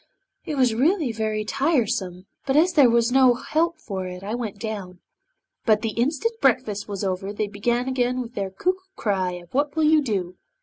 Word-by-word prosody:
'It 300 - -3
was 255 -4 +3
really 295 - +2
very 215 -1 -2
tiresome, 215 - 0 0.2
but 270 - +1
as 350 +3 +4
there 280 -7 +6
was 235 0 +3
no 260 -1 +5
help 330 +6 0
for 195 -11 -5
it 180 +1 -8
I 205 +3 -4
went 230 -4 -4
down! 200 -4 -6 0.7
'But 215 -1 +3
the 225 - 0
instant 310 - -1
breakfast 245 -6 +1
was 200 -1 -4
over 190 +1 -2
they 210 +1 -2
began 235 +5 -1
again 250 -2 -1
their 195 -4 -3
cuckoo 365 - -1 0.2
cry 190 -4 -1
of 175 -1 -11
"What 285 +2 0
will 320 - +1
you 310 0 +5
do?" 190 -8 -3
235 Hz, 185 wpm, -24 LUFS, 200-275 Hz, 0.7 s, there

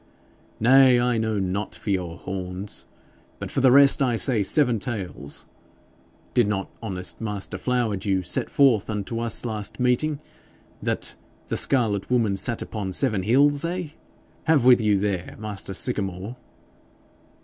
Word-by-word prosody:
'Nay, 130 +1 +6
I 120 -1 +1
know 110 -1 -1
not 95 +2 -3
for 105 - -4
your 90 -3 -2
horns; 95 +2 -5 0.5
but - - -7
for 135 - -1
the 130 -1 +5
rest 140 +1 +6
I 125 -3 +2
say 115 -1 +2
seven 120 +2 +2
tails. 95 - -5 0.9
Did - - +3
not 95 -2 -3
honest 95 -4 -3
master 105 -3 -3
Flowerdew 105 -6 -1
set - - -3
forth 125 -8 +3
unto 105 +2 -3
us 115 0 0
last 110 -1 -4
meeting 125 +4 +1 0.6
that - - -3 0.4
the - - -1
scarlet 110 -7 +1
woman 115 -5 +1
sat 110 +4 +1
upon 100 -4 -5
seven 110 -4 +1
hills 140 - +3
eh? 175 -1 -3 0.6
Have 155 -6 +3
with 125 -2 +6
you 105 -2 +2
there, 95 -3 -3
master 105 -2 -5
Sycamore!' 100 -2 -1
110 Hz, 140 wpm, -24 LUFS, 100-125 Hz, 0.9 s, Nay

